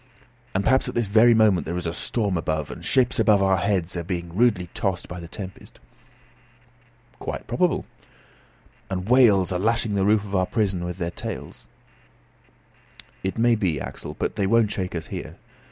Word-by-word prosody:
"And 95 - +1
perhaps 130 +3 +2
at - - -7
this 120 - +1
very 110 +4 +5
moment 110 -5 +3
there 85 +2 -2
is 90 - -4
a 80 - -2
storm 100 0 -1
above, 80 -2 -2
and - - -9
ships 125 -2 +2
over 100 -3 +4
our 95 -1 +3
heads 90 -2 0
are 85 - -3
being 85 -1 -5
rudely 105 -5 +3
tossed 95 -3 -2
by 90 +1 -7
the 85 - -8
tempest." 95 +2 -9 1.4
"Quite - - -5
probable." - - 0 1.0
"And 95 0 -3
whales 110 -8 +5
are 90 - -1
lashing 110 +1 +1
the 100 -1 +1
roof 105 +1 +3
of 100 -1 -9
our 95 -1 +2
prison 100 -6 0
with 90 0 -5
their 85 -2 -3
tails?" - - -7 1.5
"It 95 +3 -2
may 120 +1 +4
be, 95 -10 0
Axel, - - -7
but - - -3
they 100 - +1
won't 115 0 +3
shake 90 -2 -3
us 80 - -4
here. - - -7
95 Hz, 180 wpm, -24 LUFS, 90-110 Hz, 1.5 s, very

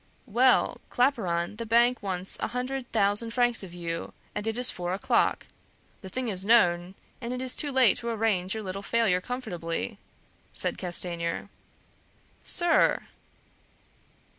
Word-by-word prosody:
"Well, 250 +2 +3
Claparon, 210 -8 0
the 230 - -4
bank 240 +2 +3
wants 190 -1 -2
a - - -1
hundred 250 +1 -4
thousand 215 +2 +2
francs 240 -2 +2
of 190 -3 -9
you, 170 -1 -5 0.2
and 210 - -4
it 225 +1 -1
is 250 0 +7
four 180 +1 -3
o'clock; 200 - +1 0.5
the 190 - -9
thing 255 +5 -3
is 190 -4 -2
known, 180 -4 +3 0.3
and 235 0 -4
it 250 - -3
is 255 -1 -1
too 290 - 0
late 260 -5 +4
to 235 - -4
arrange 215 -4 0
your 220 - -5
little 195 0 -5
failure 200 -4 +1
comfortably," 210 -4 -4 0.5
said - - 0
Castanier. 175 0 -1 0.9
"Sir!" 345 -2 +3
215 Hz, 140 wpm, -27 LUFS, 180-245 Hz, 0.9 s, is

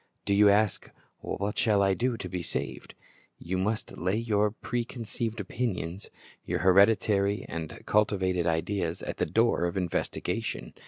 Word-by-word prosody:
Do 100 - +1
you 105 +1 +6
ask, 105 0 +2 0.3
What 100 +1 -3
shall 105 -3 +3
I 95 0 +3
do 120 +3 0
to - - -5
be 90 -1 -4
saved? 70 -5 -5 0.4
You 90 +2 -3
must 105 +3 -2
lay 90 +4 0
your 105 -2 +2
preconceived 115 0 -4
opinions, 100 -4 -3 0.3
your - - -1
hereditary 100 +1 +4
and 80 -2 -4 0.2
culti 105 -1 +3
vated 90 -2 0
ideas, 85 +1 -1
at - - -4
the - - 0
door 115 -5 +2
of 85 +2 -2
investigation. 90 -3 -2
100 Hz, 150 wpm, -28 LUFS, 90-110 Hz, 0.4 s, you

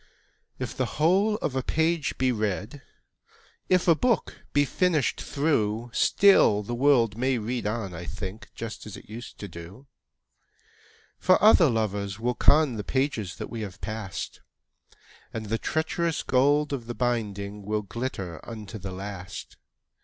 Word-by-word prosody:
II. - - -32 0.6
If - - -5
the - - 0
whole 190 +7 +3
of 135 - -1
a 130 - +1
page 160 +1 0
be 130 0 +2
read, 110 +4 -2 0.9
If 185 -1 +3
a 170 - +8
book 235 +6 0
be 145 0 +3
finished 160 -2 +1
through, 120 -6 0
Still 150 - +5
the 120 - -5
world 120 -4 +3
may 130 0 +2
read 115 +1 -2
on, 105 -4 -3
I 85 +1 -6
think, 95 +4 -6
Just 115 -1 -6
as 105 - -8
it - - -14
used 115 +3 -9
to 100 - -6
do; 85 +9 -11 1.3
For 185 0 +4
other 195 -7 +7
lovers 105 -3 -1
will 120 +2 0
con 145 -1 +4
The 105 - -3
pages 130 -7 -1
that - - -7
we 115 -2 -4
have 95 -3 -7
passed, 105 -1 -5 0.9
And 110 -1 -5
the 115 +1 0
treacherous 160 0 -1
gold 145 +3 +3
of 120 -4 -4
the 120 - -4
binding 105 -4 -2
Will 105 +1 -1
glitter 100 -6 -5
unto 110 -1 -8
the 95 0 -6
last. 95 -1 -7
115 Hz, 155 wpm, -27 LUFS, 105-145 Hz, 1.3 s, a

